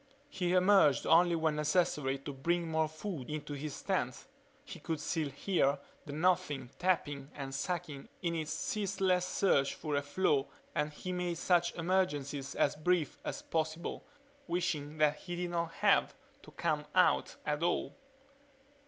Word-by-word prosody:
He 180 -1 -1
emerged 185 -6 +5
only 170 +1 +5
when 160 -2 +1
necessary 150 -3 +1
to 140 +1 -7
bring 170 +5 0
more 160 0 +2
food 155 -3 -6
into 150 -1 -4
his 145 +1 -5
tent. - - -1 0.4
He - - -9
could 160 -2 -3
still 150 0 -1
hear 140 -1 +1 0.3
the - - -5
Nothing 145 -5 +1
tapping 145 -7 0
and 135 -2 -5
sucking 155 -1 -3
in 170 -1 0
its 155 -2 -3
ceaseless 190 -5 0
search 140 -8 +2
for 155 -2 -4
a 140 - +2
flaw 145 -1 +1 0.3
and 150 0 0
he 185 +5 -6
made 180 -1 -2
such 175 0 +2
emergences 150 -6 -1
as 140 - +2
brief 160 -1 0
as - - -4
possible, 160 +1 -2 0.4
wishing 160 -4 -1
that 150 -1 +3
he 175 +2 -6
did 175 0 -3
not 170 -1 -1
have - - +3 0.3
to - - -14
come 150 -3 -1
out 185 - +3
at 150 +1 -1
all. 175 +1 0
160 Hz, 155 wpm, -33 LUFS, 145-180 Hz, 0.4 s, emerged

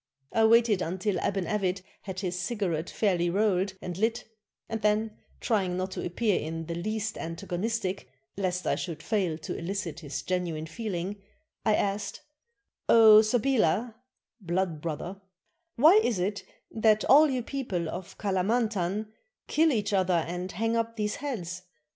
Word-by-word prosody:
I 225 -1 +4
waited 225 -3 +5
until 185 +3 -1
Aban 195 +1 -1
Avit 190 -3 -1 0.2
had 190 -1 -6
his 180 -2 -2
cigarette 180 -4 -2
fairly 180 -5 +1
rolled 195 0 +1
and 180 0 -5
lit, 230 +3 +1 0.4
and 225 -1 -4
then, 215 +1 +1 0.2
trying 190 -6 0
not 185 +1 -2
to - - -4
appear 200 +3 +1
in 165 +1 -4
the 170 - -4
least 215 +5 -3
antagonistic, 185 - -3 0.3
lest 185 -2 -2
I - - +2
should 170 -4 -4
fail 190 -8 0
to 160 - -5
elicit 170 -2 -4
his 145 -4 -5
genuine 175 -4 -2
feeling, 195 +1 -4 0.4
I 215 - +3
asked, 200 0 -2 0.7
"0 220 -2 +9
Sabilah 225 -1 +1 0.5
[blood 175 -4 -1
brother], 170 +5 -5 0.5
why 320 - +7
is 230 - +1
it 200 +3 -2 0.3
that 215 -1 +3
all 300 +3 +7
you 255 -3 -1
people 225 - -3
of 180 +2 -7
Kalamantan 205 0 0 0.4
kill 320 +1 +3
each 210 -4 -1
other 185 -3 +2
and 180 +2 -4
hang 225 +5 0
up 230 0 -1
these 210 -1 -2
heads? 180 - -4
195 Hz, 150 wpm, -28 LUFS, 180-220 Hz, 0.7 s, 0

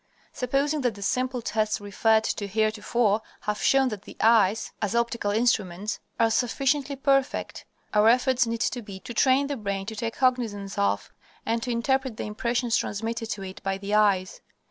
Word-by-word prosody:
Supposing 280 +4 0
that 245 -5 0
the 200 - -7
simple 255 +2 -1
tests 215 -1 0
referred 220 +2 +2
to 205 -2 -2
heretofore 215 +1 +1 0.2
have 210 0 -3
shown 270 -1 +4
that 210 -4 -6
the - - -13
eyes, 220 -2 +3
as 210 +1 -1
optical 235 -3 0
instruments, 210 -3 0 0.2
are 225 -1 +4
sufficiently 275 +4 0
perfect, 275 -1 0 0.3
our 210 +1 +5
efforts 250 0 +3
need 230 0 -3
to 245 - -1
be 200 -3 -9
to 240 - -8
train 260 +4 +3
the 285 0 -3
brain 200 -3 -3
to 220 +2 -6
take 225 +2 -3
cognizance 225 -6 0
of, 100 0 0 0.3
and 230 +1 0
to 245 - -4
interpret 260 0 0
the - - -3
impressions 235 +2 -1
transmitted 225 +2 -3
to 205 -3 -4
it 190 0 -8
by 195 0 -2
the 200 +1 -5
eyes. 200 -3 +2
225 Hz, 175 wpm, -26 LUFS, 205-250 Hz, 0.3 s, our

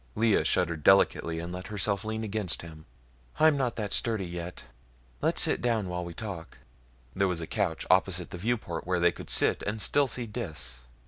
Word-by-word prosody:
Lea 110 -1 +3
shuddered 85 -4 +1
delicately 85 -4 +4
and 85 +1 -5
let 90 +1 -6
herself 100 -1 -1
lean 110 +1 -3
against 105 -5 -2
him. 80 -2 -11 0.5
"I'm 155 -1 +6
not 130 -4 0
that 105 -3 -3
sturdy 110 -5 0
yet; 85 0 -6 0.6
let's - - +4
sit - - +1
down 115 -6 0
while 90 0 -3
we 85 -1 -7
talk." 95 -7 -6 0.6
There 95 0 +2
was 90 -2 -1
a 80 - -3
couch - - -1
opposite 90 -2 +2
the 90 - -6
viewport 100 -6 -2
where 90 -1 +1
they 85 0 +4
could - - -10
sit - - +2
and 105 +2 -3
still 140 +8 +3
see 125 -1 -3
Dis. 80 - -4
95 Hz, 190 wpm, -29 LUFS, 85-110 Hz, 0.6 s, I'm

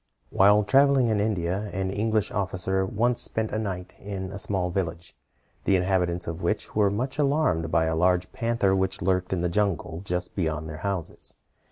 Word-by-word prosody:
While 105 +2 +5
travelling 135 +1 +4
in 110 -2 +1
India, 100 -1 -1
an 95 0 -2
English 110 +1 0
officer 95 0 -1
once 120 +4 +2
spent 110 -1 +1
a 110 - -1
night 95 -4 -5
in 95 -2 -6
a 100 - -5
small 95 -3 0
village, 85 -2 -4 0.5
the 100 - +3
inhabitants 90 -1 0
of 85 +2 -5
which 100 +5 -2
were 105 -2 +3
much 130 +8 -3
alarmed 140 - +1
by 80 0 +2
a 80 0 0
large 90 +1 +1
panther 115 -5 0
which 95 0 -1
lurked 90 -1 0
in 95 -2 -1
the 90 - +1
jungle 90 -3 -1
just 90 -2 -3
beyond 80 -4 -2
their 75 0 -7
houses. 95 -2 +1
95 Hz, 180 wpm, -26 LUFS, 90-105 Hz, 0.5 s, While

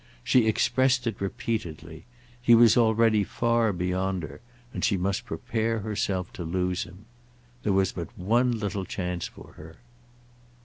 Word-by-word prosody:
She 125 -4 +3
expressed 130 +3 +2
it 115 -5 -3
repeatedly; 85 -6 -4 0.4
he 120 -1 +6
was 115 -1 +6
already 110 -2 +4
far 115 +2 +1
beyond 90 0 -2
her, 80 - -9 0.3
and - - -4
she 100 - +2
must 95 +2 -1
prepare 115 -1 -2
herself 100 -3 -2
to 85 - -6
lose 90 +2 -1
him. 95 +3 -15 0.6
There 105 - 0
was 95 0 +2
but 85 -3 -5
one 120 +7 +2
little 105 -4 -3
chance 90 -3 -3
for - - -14
her. 80 +1 -12
100 Hz, 145 wpm, -26 LUFS, 90-115 Hz, 0.6 s, he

